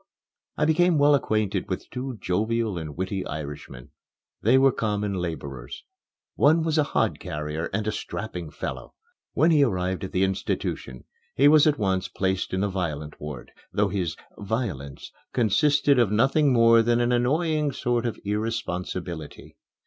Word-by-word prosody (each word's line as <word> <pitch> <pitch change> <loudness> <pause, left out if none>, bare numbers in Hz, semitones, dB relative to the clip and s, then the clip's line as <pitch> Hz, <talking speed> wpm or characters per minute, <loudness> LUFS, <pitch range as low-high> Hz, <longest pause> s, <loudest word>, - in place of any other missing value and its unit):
I 150 - +2
became 165 +2 +3
well 145 0 +5
acquainted 110 -7 0
with - - -4
two 125 -1 -5
jovial 110 +3 0
and 80 -3 -6
witty 95 +1 -2
Irishmen. 70 -4 -7 0.5
They 120 +5 +4
were 135 0 +5
common 105 -3 -1
laborers. 70 -9 -5 0.5
One 160 +3 +4
was 160 -1 +1
a - - +5
hodcarrier, 75 - -2
and 105 +2 -2
a 110 - 0
strapping 90 -6 -5
fellow. 75 - -6 0.4
When 165 - +4
he 155 -3 +5
arrived 95 -6 -1
at 95 - -5
the 95 - +1
institution, 65 -8 -3 0.3
he 140 - +5
was 155 0 +6
at 150 -1 +3
once 95 -3 0
placed 95 -1 -2
in 95 - -1
the 100 - +1
violent 80 -6 -4
ward, 75 -4 -7 0.2
though - - +1
his 90 -5 -2 0.2
"violence" 95 - -4 0.2
consisted 140 +4 +3
of 115 -5 +3
nothing 135 +6 +3
more 115 -1 +6
than 120 +1 +2
an 120 0 +1
annoying 150 +5 +1
sort 120 -2 -1
of 115 - -4
irresponsibility. 90 -6 -4
105 Hz, 150 wpm, -25 LUFS, 90-130 Hz, 0.5 s, was